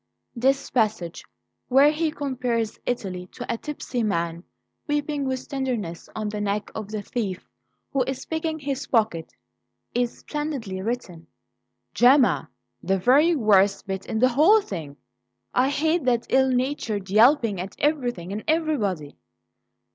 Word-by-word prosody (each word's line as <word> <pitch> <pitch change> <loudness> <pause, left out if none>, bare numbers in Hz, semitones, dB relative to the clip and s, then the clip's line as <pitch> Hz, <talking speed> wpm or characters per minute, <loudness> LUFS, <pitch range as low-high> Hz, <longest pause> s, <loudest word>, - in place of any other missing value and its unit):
This 270 +3 +1
passage, 215 -8 0 0.4
where 275 +3 +6
he 315 +1 0
compares 250 -6 -2
Italy 185 -7 -3
to - - -6
a 235 - -1
tipsy 260 -1 -4
man 170 -5 -1 0.4
weeping 295 -1 -1
with 260 -1 -3
tenderness 245 -11 -3
on 215 -1 -2
the 210 0 -4
neck 205 0 -2
of 215 -2 -6
the 215 -1 -4
thief 200 -7 -4 0.5
who 275 - +2
is 265 -1 -4
picking 320 0 -2
his 280 -2 -4
pocket, 210 -9 0 0.6
is 245 -1 -1
splendidly 275 -11 -4
written." 190 -7 -4 0.7
"Gemma! 250 +2 +4 0.3
The 195 - +1
very 285 - +4
worst 205 -6 +3
bit 190 0 -4
in 220 - -2
the 255 +3 +4
whole 315 - +6
thing! 160 - -7 0.6
I 255 +2 +3
hate 315 +2 +1
that 240 -2 +2
ill 265 0 +4
natured 245 -7 -1
yelping 225 -3 +4
at 190 +1 -7
everything 245 - -1
and 215 - -4
everybody!" 225 - 0
240 Hz, 140 wpm, -24 LUFS, 200-280 Hz, 0.7 s, where